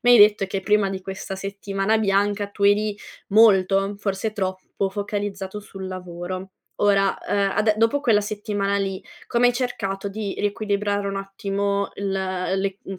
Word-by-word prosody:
mi 245 - +5
hai 240 - +8
detto 205 -1 +6
che 195 0 -3
prima 210 0 +3
di 190 -1 -5
questa 190 0 -6
settimana 195 +2 -1
bianca 205 0 +1
tu 200 0 -8
eri 205 +1 +3 0.3
molto, 195 -2 +4
forse 200 +1 -2
troppo, 190 -1 -2
focalizzato 205 0 -4
sul 195 -2 -8
lavoro. 185 +1 -6 0.3
Ora, 195 -1 +3
uhm, 200 -1 +1
ade 215 +1 +4
dopo 230 +5 +3
quella 225 -7 +4
settimana 205 -1 -2
lì, 195 -1 -2 0.3
come 240 +1 +3
hai 245 - +3
cercato 200 -6 -2
di 205 -1 -4
riequilibrare 205 -1 -1
un 195 - -3
attimo 200 0 -2
il 200 0 -3
l'e 190 0 -1
mhmm, 190 -1 -7
200 Hz, 155 wpm, -23 LUFS, 195-210 Hz, 0.3 s, hai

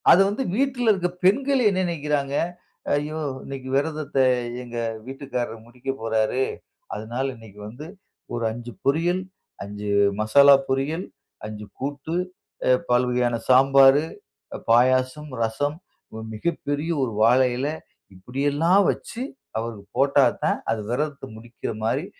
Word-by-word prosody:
அத - - +9
வந்து 210 +7 -2
வீட்ல 245 0 +1
இருக்கிற 180 -3 0
பெண்கள் 265 +8 +3
என்ன 190 -2 0
நெனைக்கிறாங்க, 145 -4 -1 0.6
"ஐயோ 150 +2 -1 0.3
இன்னைக்கு 135 -1 -7
விரதத்த 155 +1 -2 0.5
எங்க 120 -1 -8 0.3
வீட்டுக்காரர் 125 -4 -5
முடிக்க 125 +3 -9
போறாரு. 110 +3 +1 0.5
அதனால 115 +5 -3
இன்னைக்கு 110 -3 -14
வந்து 125 +8 -9 0.5
ஒரு 120 -1 -2
5 120 +2 -7
பொரியல், 170 +6 +2 0.4
5 105 +1 -6 0.3
மசாலா 140 +6 +7
பொரியல், 140 +7 -1 0.4
5 105 0 -7
கூட்டு, 145 +4 -4 0.5
அ - - +4 0.2
பல்வகையான 125 -1 +2
சாம்பார், 135 +2 +7 0.7
பாயாசம், 130 +5 +3
ரசம், 145 +7 -1 0.6
மிகப்பெரிய 145 +5 -2
1 120 -4 -2
வாழை 125 +3 +5
இலை 145 +4 -1 0.4
இப்டியெல்லாம் 145 - +2
வச்சு 235 - -7 0.4
அவருக்கு 110 -2 -4
போட்டா 140 +1 +4 0.2
தான் - - +2
அது 110 -1 -1
விரதத்த 140 +3 -2
முடிக்கிற 115 +2 -7
மாரி 125 +9 0
135 Hz, 115 wpm, -24 LUFS, 120-150 Hz, 0.7 s, அத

